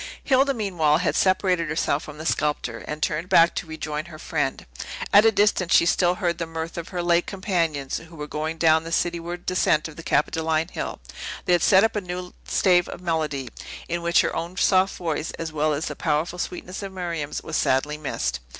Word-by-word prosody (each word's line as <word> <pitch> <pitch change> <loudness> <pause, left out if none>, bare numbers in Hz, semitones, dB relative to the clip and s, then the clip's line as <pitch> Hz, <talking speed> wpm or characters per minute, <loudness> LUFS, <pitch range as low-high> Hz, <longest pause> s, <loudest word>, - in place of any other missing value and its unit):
Hilda, 270 +1 +3
meanwhile, 175 -9 +2
had 175 +1 0
separated 185 -3 +2
herself 150 -2 0
from 150 -2 -10
the 155 - -7
sculptor, 145 -8 -1
and 150 0 -4
turned 165 +3 -1
back 170 -3 +6
to - - -4
rejoin 155 -1 -4
her 170 -2 -11
friend. - - -2 0.5
At 205 +2 +8
a - - +5
distance, 200 -4 +3
she - - +6
still 175 +1 +3
heard 175 -4 -1
the 165 - -2
mirth 165 0 -5
of 170 -1 -5
her 175 -2 -3
late 175 0 +2
companions, 170 -8 -1
who 165 +1 -14
were 150 -1 -5
going 155 +2 -3
down 160 -1 +4
the 165 - -7
cityward 175 +1 -2
descent 165 -4 +2
of 160 - -12
the - - -7
Capitoline 160 +1 0
Hill; - - -5 0.5
they 180 - +3
had 175 - +4
set 190 +3 +6
up 225 0 +1
a 210 - 0
new 180 -1 -6
stave 180 -2 +3
of - - -7
melody, 155 -6 -2 0.4
in 170 0 -2
which 170 0 +4
her - - -2
own 170 +3 -4
soft 190 -1 +3
voice, 165 -2 -2
as 160 -1 -5
well 155 0 +1
as 150 +2 -1
the - - -4
powerful 160 +3 -1
sweetness 180 +2 -5
of 195 -1 -6
Miriam's, 170 -6 -4
was 160 - -5
sadly 150 +3 +1
missed. - - -2
170 Hz, 205 wpm, -24 LUFS, 155-180 Hz, 0.5 s, At